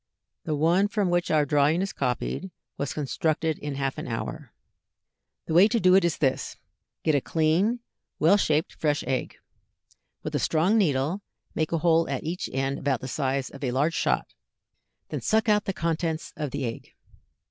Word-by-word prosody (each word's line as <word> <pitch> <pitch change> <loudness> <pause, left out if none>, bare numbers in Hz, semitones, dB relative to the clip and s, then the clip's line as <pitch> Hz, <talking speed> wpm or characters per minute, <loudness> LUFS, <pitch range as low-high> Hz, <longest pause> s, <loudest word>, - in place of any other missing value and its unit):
The 155 - -1
one 170 +7 +3
from 205 -4 0
which 175 0 +1
our 155 -2 +3
drawing 150 +5 +3
is 195 - -4
copied 135 +8 -2 0.3
was 140 -2 -3
constructed 155 +2 -1
in 145 -1 -4
half 135 -1 -2
an - - -6
hour. 115 -2 -5 0.9
The - - -3
way 180 +5 +7
to 230 +1 +1
do 185 -2 +5
it 190 0 +6
is 170 -3 +1
this: 135 -3 -1 0.5
Get 155 - +2
a 140 - +3
clean, 170 - +1 0.4
well 165 +6 +5
shaped 155 -5 +1
fresh 150 -2 0
egg. 130 -2 -2 0.9
With - - -4
a - - +1
strong 165 +7 +2
needle 160 -2 +1 0.3
make 155 - -1
a 165 - +1
hole 165 0 +3
at - - -2
each 170 +3 -3
end 135 +1 -1
about 135 -3 0
the 130 - -5
size 135 -1 -1
of 140 - -10
a 130 - 0
large 140 +6 +1
shot, - - 0 0.8
then - - -4
suck 220 +1 +2
out 210 -1 +3
the - - 0
contents 165 -2 -2
of 150 -2 -3
the 140 0 -3
egg. 115 - -7
155 Hz, 180 wpm, -26 LUFS, 140-180 Hz, 0.9 s, way